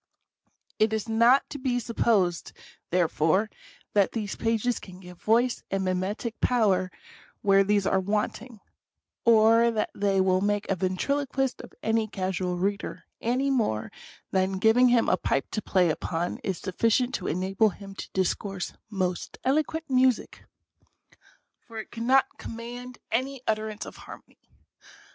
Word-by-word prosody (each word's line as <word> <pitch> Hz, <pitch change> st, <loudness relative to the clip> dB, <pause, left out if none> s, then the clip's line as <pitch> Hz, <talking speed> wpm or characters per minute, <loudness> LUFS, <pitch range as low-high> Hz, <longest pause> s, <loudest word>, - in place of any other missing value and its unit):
It 215 Hz, 0 st, +3 dB
is 220 Hz, 0 st, -2 dB
not 235 Hz, +4 st, +4 dB
to 285 Hz, -, -5 dB
be 255 Hz, -2 st, 0 dB
supposed, 210 Hz, -7 st, 0 dB, 0.4 s
therefore, 180 Hz, +3 st, +2 dB, 0.4 s
that 200 Hz, -2 st, +3 dB
these 210 Hz, -4 st, -3 dB
pages 230 Hz, +1 st, 0 dB
can 185 Hz, -1 st, -12 dB
give 180 Hz, -2 st, -13 dB
voice 235 Hz, +3 st, +2 dB
and 195 Hz, 0 st, -1 dB
mimetic 190 Hz, +5 st, -2 dB
power 200 Hz, -7 st, +2 dB, 0.5 s
where 195 Hz, -1 st, +5 dB
these 205 Hz, 0 st, +1 dB
are 195 Hz, -, +2 dB
wanting; 210 Hz, +3 st, -3 dB, 0.6 s
or 230 Hz, 0 st, +6 dB
that 220 Hz, -2 st, -1 dB
they 195 Hz, -1 st, +1 dB
will 185 Hz, 0 st, +3 dB
make 205 Hz, +1 st, 0 dB
a -, -, +2 dB
ventriloquist 270 Hz, +9 st, -1 dB
of -, -, -13 dB
any 220 Hz, 0 st, +1 dB
casual 185 Hz, -3 st, -2 dB
reader, 200 Hz, +2 st, -3 dB, 0.2 s
any 255 Hz, +4 st, +1 dB
more 210 Hz, -, 0 dB, 0.4 s
than 190 Hz, 0 st, +1 dB
giving 225 Hz, +5 st, +5 dB
him 240 Hz, -1 st, +3 dB
a -, -, +3 dB
pipe 135 Hz, -5 st, -1 dB
to 215 Hz, -, -2 dB
play 180 Hz, -5 st, +2 dB
upon 165 Hz, +2 st, -3 dB
is 190 Hz, -3 st, -2 dB
sufficient 230 Hz, +6 st, +1 dB
to -, -, -3 dB
enable 190 Hz, +6 st, +1 dB
him 195 Hz, 0 st, -10 dB
to -, -, -8 dB
dis 190 Hz, -2 st, +1 dB
course 195 Hz, -3 st, -6 dB
" -, -, -50 dB
most 180 Hz, -1 st, -3 dB
eloquent 310 Hz, +4 st, 0 dB
music, 255 Hz, -3 st, +1 dB, 0.5 s
" -, -, -32 dB
for 230 Hz, -1 st, -10 dB
it 220 Hz, -, -7 dB
could 230 Hz, -, -7 dB
not 260 Hz, +3 st, +4 dB
"command 245 Hz, +2 st, -8 dB
any 260 Hz, +3 st, -1 dB
utterance 215 Hz, -1 st, -2 dB
of -, -, -10 dB
harmony. -, -, -13 dB
215 Hz, 150 wpm, -27 LUFS, 190-235 Hz, 0.6 s, or